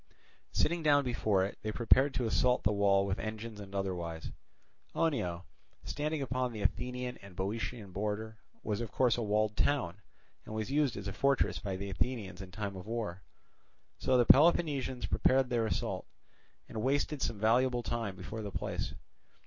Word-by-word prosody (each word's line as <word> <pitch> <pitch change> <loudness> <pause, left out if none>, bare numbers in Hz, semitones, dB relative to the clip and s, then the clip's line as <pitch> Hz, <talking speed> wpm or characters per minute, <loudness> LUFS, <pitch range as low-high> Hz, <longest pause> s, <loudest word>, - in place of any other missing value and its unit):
Sitting 170 +1 +1
down 145 -2 +5
before 105 -6 +2
it, 100 - -7
they 110 - -2
prepared 130 +5 +4
to 125 0 0
assault 125 +2 +2
the 105 - +3
wall 100 -1 +3
with 95 -1 -1
engines 110 0 -5
and 100 -1 -9
otherwise. 85 -4 -3 0.6
Oenoe, 105 - 0 0.4
standing 150 0 -2
upon 130 -1 -1
the 110 -3 -5
Athenian 125 +4 -1
and 100 -2 -13
Boeotian 105 +2 -3
border, 105 +3 -3 0.2
was 105 0 -1
of 115 - -4
course 125 -3 +3
a 120 - -2
walled 105 0 +1
town, 125 -12 +1 0.5
and 110 - -7
was 110 +4 -3
used 145 -3 +2
as 100 -1 -5
a 100 - -3
fortress 140 -1 +2
by 95 -3 -3
the 100 +1 -4
Athenians 100 -3 -2
in 95 - -8
time 100 +2 -4
of 95 +2 -8
war. 110 -6 -3 0.8
So 130 - +3
the 120 - +5
Peloponnesians 140 -3 +4
prepared 130 0 +3
for - - -15
their 115 -3 +1
assault, - - -2 0.6
and 110 - -4
wasted 140 +3 0
some 110 - -1
valuable 120 +3 +3
time 115 -5 -2
before 105 +4 -6
the 105 - -4
place. 95 - -3
110 Hz, 175 wpm, -32 LUFS, 100-125 Hz, 0.8 s, down